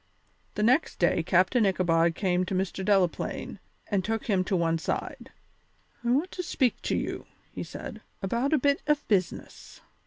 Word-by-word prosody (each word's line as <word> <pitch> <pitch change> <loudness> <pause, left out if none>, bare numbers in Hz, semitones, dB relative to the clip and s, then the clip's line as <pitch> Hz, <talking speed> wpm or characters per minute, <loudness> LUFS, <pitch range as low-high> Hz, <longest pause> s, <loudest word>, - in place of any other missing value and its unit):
The 210 - 0
next 255 +8 +2
day 175 -1 +2
Captain 185 +8 +3
Ichabod 170 -4 +2
came 180 -2 +1
to 190 +1 -3
Mr. 190 +1 -2
Delaplaine 190 -3 0 0.3
and 200 -3 0
took 225 +2 -2
him 195 -4 +2
to 190 - 0
one 165 -2 +1
side. - - -4 0.7
"I 235 - -1
want 290 +9 +1
to 360 - -4
speak 260 -7 0
to - - -1
you," - - -4 0.2
he - - -6
said, - - -8 0.2
"about 235 +8 -1
a 310 - +4
bit 280 +2 +2
of 295 -1 +1
business." 185 -5 -2
195 Hz, 165 wpm, -27 LUFS, 180-245 Hz, 0.7 s, a